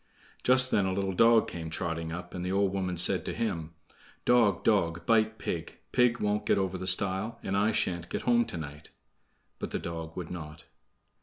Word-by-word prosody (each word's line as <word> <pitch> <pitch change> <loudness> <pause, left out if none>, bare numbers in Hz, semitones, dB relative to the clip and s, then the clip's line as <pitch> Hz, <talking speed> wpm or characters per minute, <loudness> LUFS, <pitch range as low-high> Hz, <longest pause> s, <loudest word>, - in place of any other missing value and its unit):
Just 130 0 +5
then 100 -2 +2
a 95 - -1
little 95 0 -1
dog 115 +3 +5
came 80 -2 -6
trotting 80 0 -3
up, 90 +1 -7
and 90 - -5
the 90 - -2
old 100 0 +1
woman 95 -2 -2
said 85 - +4
to - - -3
him: 85 -7 -3 0.5
"Dog, 115 -7 +3
dog, 85 -6 +1
bite 110 +1 +2
pig; 85 -6 -5
Pig 125 -1 +3
won't 105 0 -1
get - - +3
over 95 -1 -1
the 95 0 -5
stile, 95 +4 +1
And 95 - -2
I 105 +2 +2
sha'n't 85 -5 -1
get - - -4
home 120 -1 +3
to - - -6
night." 75 -1 -8 0.7
But - - -4
the - - -2
dog 80 -1 -6
would 90 -3 -5
not. 75 -3 -8
95 Hz, 200 wpm, -29 LUFS, 85-110 Hz, 0.7 s, Just